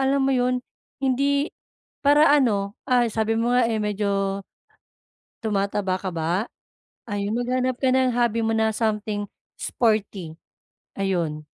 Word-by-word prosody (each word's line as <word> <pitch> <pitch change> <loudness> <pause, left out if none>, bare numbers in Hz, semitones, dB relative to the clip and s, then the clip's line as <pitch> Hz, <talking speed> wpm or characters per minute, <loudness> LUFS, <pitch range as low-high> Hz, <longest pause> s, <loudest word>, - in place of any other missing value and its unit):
alam 270 0 +2
mo 270 - +2
yun, 250 0 +2 0.4
hindi 280 +3 +1 0.5
para 290 +2 +6
ano, 205 -7 +1
ah, 245 -2 +4
sabi 220 +1 0
mo 240 +2 +1
nga, 245 -2 +4
eh, 220 -1 0
medyo 200 -1 -1 1.0
tumataba 200 -3 0
ka 190 0 -4
ba? 170 +5 0 0.6
Ayun, 205 +1 -2
maghanap 255 +1 0
ka 265 - +2
ng 260 -1 +3
hobby 235 -1 +1
mo 225 - +1
na 220 0 +2
something 210 -2 -1 0.3
sporty, 200 -8 -1 0.6
ayun. 170 -6 -1
220 Hz, 130 wpm, -24 LUFS, 200-250 Hz, 1.0 s, para